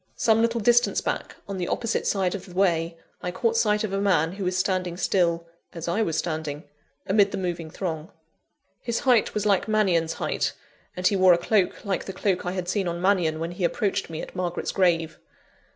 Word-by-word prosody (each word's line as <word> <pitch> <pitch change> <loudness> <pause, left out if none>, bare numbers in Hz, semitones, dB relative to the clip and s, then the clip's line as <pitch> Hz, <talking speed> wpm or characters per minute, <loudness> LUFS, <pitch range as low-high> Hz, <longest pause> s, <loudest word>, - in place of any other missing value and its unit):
Some 225 -1 +3
little 230 0 +1
distance 240 +3 +3
back, - - -3
on 200 -1 -4
the 175 - -2
opposite 230 -1 -1
side 190 -3 +1
of 200 -2 -6
the 180 - -12
way, 170 -3 +1 0.2
I 180 - -3
caught 225 +6 0
sight 210 -2 +2
of 205 -2 -3
a 195 - 0
man 165 -5 +2
who 195 +1 -6
was 180 0 0
standing 185 -2 -1
still 170 -2 +1 0.3
(as 165 -1 -6
I 175 +6 +1
was 165 -7 0
standing), 155 -3 -3 0.4
amid 200 +1 +4
the - - -3
moving 175 -3 -3
throng. 160 -2 -4 0.7
His 235 -1 -2
height 245 -5 +3
was 210 -1 -1
like 200 -1 +2
Mannion's 185 -7 +2
height; - - -1 0.4
and 180 - -4
he 200 - +4
wore 185 -1 +6
a - - +3
cloak 190 +2 0
like 195 -2 -1
the 195 - -6
cloak 185 -1 -1
I 180 - -1
had 185 -2 -3
seen 190 0 0
on 170 0 -3
Mannion, 175 -4 +2
when 165 +1 -3
he 180 +1 -5
approached 195 +2 0
me 160 -1 -5
at - - -10
Margaret's 175 -1 -2
grave. 165 -4 +1
185 Hz, 210 wpm, -25 LUFS, 170-200 Hz, 0.7 s, wore